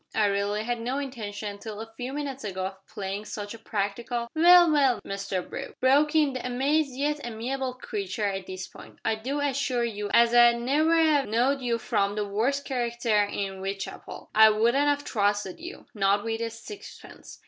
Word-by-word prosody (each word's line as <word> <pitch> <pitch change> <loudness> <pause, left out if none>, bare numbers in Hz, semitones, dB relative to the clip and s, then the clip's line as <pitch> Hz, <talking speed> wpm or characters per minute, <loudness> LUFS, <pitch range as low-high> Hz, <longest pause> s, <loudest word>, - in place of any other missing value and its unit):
I 215 - +3
really 200 +1 0
had 240 0 -2
no 250 +4 -2
intention 210 -7 -5
till 215 -1 -7
a 225 0 -8
few 250 +2 -5
minutes 280 -2 -5
ago 190 -3 -3
of 190 0 -8
playing 205 -1 -5
such 205 0 -6
a 230 - -10
practical 225 +3 -3
" - - -53
"Well, 345 +1 +7
well, 270 -6 +3
Mr 195 -2 -3
Brooke," - - -7
broke 290 +4 +3
in 300 -3 +3
the 255 - -5
amazed 270 +3 0
yet 295 +2 -1
amiable 250 +3 -3
creature 365 - -4
at 195 -2 -3
this 185 0 -6
point, - - -14
"I 225 - +2
do 255 +7 -3
assure 275 -3 0
you 210 -3 -3
as 235 0 +5
I'd 240 0 +7
never 300 +7 +2
'ave 300 -5 +3
know'd 255 +5 +2
you 240 -2 0
from 200 -2 0
the 210 -1 -1
worst 240 +8 -1
character 235 -4 +1
in 195 -1 -4
W'itechapel. 195 0 -6
I 220 0 +8
wouldn't 235 +7 +2
have 290 0 +1
trusted 205 -3 0
you 345 +2 -9
not 200 -1 +2
with 225 0 -3
a 230 - -1
sixpence. 235 - -11
235 Hz, 190 wpm, -27 LUFS, 205-275 Hz, -, I